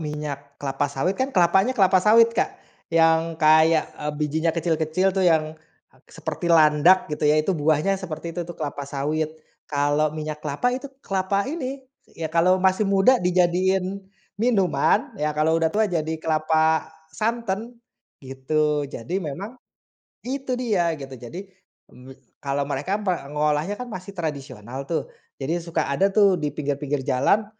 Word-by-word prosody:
minyak 150 -2 -6
kelapa 140 +1 -2
sawit 140 +6 -1
kan 265 - +1
kelapanya 190 +3 +3
kelapa 190 -2 +4
sawit 230 +3 +5
Kak, - - -1 0.3
yang 165 0 +3
kayak, 160 0 +5 0.2
eee, 150 0 -2
bijinya 155 +2 -1
kecil-kecil 165 +3 +1
tuh 190 0 +1
yang, 160 -3 +2 0.6
seperti 170 - -4
landak 160 +3 +5
gitu 150 -1 -6
ya 150 +1 +4
itu 180 +5 +1
buahnya 155 +5 +1
seperti 165 -2 -6
itu 175 - -3
tuh 175 - -8
kelapa 145 -2 -4
sawit, 150 +3 -2 0.4
kalau 145 +1 +1
minyak 155 0 -5
kelapa 150 +12 -1
itu 265 +2 -6 0.2
kelapa 195 +1 0
ini, 270 -3 -5 0.3
ya 160 - -2
kalau 175 +2 +4
masih 190 +2 +2
muda 200 +6 +4
dijadiin, 185 +2 +1 0.4
minuman, 195 - +2
ya 150 0 +1
kalau 155 +1 +2
udah 160 - +3
tua 215 +4 +2
jadi 160 -4 -2
kelapa 160 0 +1 0.3
santan, 230 +2 -2 0.5
gitu 150 +3 0
jadi 175 +13 -4
memang, 185 - -6 0.7
itu 265 0 -3
dia 190 -10 0
gitu 135 -1 -9
jadi 130 +11 -8 0.5
me 130 +1 -14 0.2
kalau 140 0 -1
mereka 145 +8 -2
mengolahnya 150 -1 -1
kan 250 - -5
masih 185 0 -7
tradisional 135 -6 -5
tuh, 165 - -1 0.3
jadi 160 +6 -2
suka 170 0 -2
ada 195 +7 +2
tuh 195 -3 +4
di 150 - 0
pinggir-pinggir 145 -1 -3
jalan, 170 +12 +2
160 Hz, 145 wpm, -23 LUFS, 150-190 Hz, 0.7 s, sawit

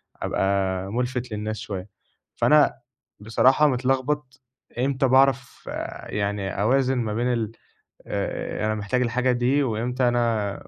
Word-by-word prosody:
أبقى 95 - -1 0.4
مُلفت 125 +1 -2
للناس 105 +1 -3
شوية، 100 -3 -6 0.5
فأنا 150 -1 +4 0.4
بصراحة 130 +7 +4
متلخبط 130 +1 -1 0.4
إمتى 135 +1 +1
باعرف 135 0 +2
آآ - - -6
يعني 100 -1 -2
أوازن 130 +4 +2
ما 110 -3 -1
بين 120 +2 0
ال 115 -2 -2 0.6
آآ، - - -3
أنا 110 0 0
محتاج 105 +4 -1
الحاجة 125 +1 +1
دي 125 +4 +2
وإمتى 125 +2 0
أنا 115 -4 0
120 Hz, 125 wpm, -24 LUFS, 110-130 Hz, 0.6 s, فأنا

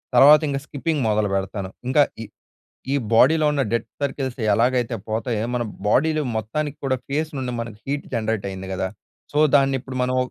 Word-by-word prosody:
తర్వాత 145 +4 +9
ఇంక 135 0 -1
స్కిప్పింగ్ 150 0 -2
మొదలుపెడతాను. 100 -2 -1 0.2
ఇంకా 145 +2 +5 0.2
ఈ - - -7 0.7
ఈ - - +2 0.2
బాడీలో 155 +6 +5
ఉన్న 140 -2 +1
డెడ్ 115 - +1 0.2
సర్కిల్స్ 135 -2 -2
ఎలాగైతే 120 +1 +2
పోతాయో, 110 0 -1
మన 120 - 0 0.2
బాడీలో 155 +7 +2
మొత్తానికి 145 +7 -3
కూడా 130 -1 +1
ఫేస్ 155 +3 -1
నుండి 125 -2 -3
మనకు 115 -2 -5
హీట్ 145 +1 -3
జనరేట్ 110 -3 -1
అయింది 95 0 -7
కదా! 95 0 -1 0.4
సో, 150 - 0 0.2
దాన్ని 135 -1 +3
ఇప్పుడు 130 0 -8
మనం 130 0 0
130 Hz, 165 wpm, -22 LUFS, 110-140 Hz, 0.7 s, తర్వాత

